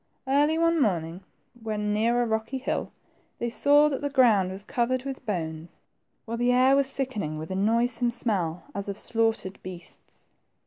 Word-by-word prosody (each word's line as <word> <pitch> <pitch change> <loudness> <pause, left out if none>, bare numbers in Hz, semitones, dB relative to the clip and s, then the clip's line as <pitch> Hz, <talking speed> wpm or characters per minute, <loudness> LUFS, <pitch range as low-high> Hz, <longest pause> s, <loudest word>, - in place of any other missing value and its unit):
Early 290 +4 +3
one 335 -1 +2
morning, 175 -5 -1 0.4
when 210 -2 -2
near 235 +3 +2
a - - -1
rocky 225 +3 -2
hill, 260 - -3 0.5
they 235 - -2
saw 290 +4 +5
that 275 -3 -2
the 285 - -1
ground 230 -9 +4
was 195 +1 -8
covered 250 +3 -1
with 270 -1 -6
bones, 160 -4 -4 0.5
while 230 +1 -4
the 245 +1 +2
air 255 +2 +5
was 275 -1 +2
sickening 220 - -3
with 155 +3 -7
a - - -2
noisome 230 +4 +1
smell, 190 -8 -1
as 200 0 -4
of 200 - -4
slaughtered 225 -5 -1
beasts. 180 -2 -12
230 Hz, 170 wpm, -26 LUFS, 195-260 Hz, 0.5 s, saw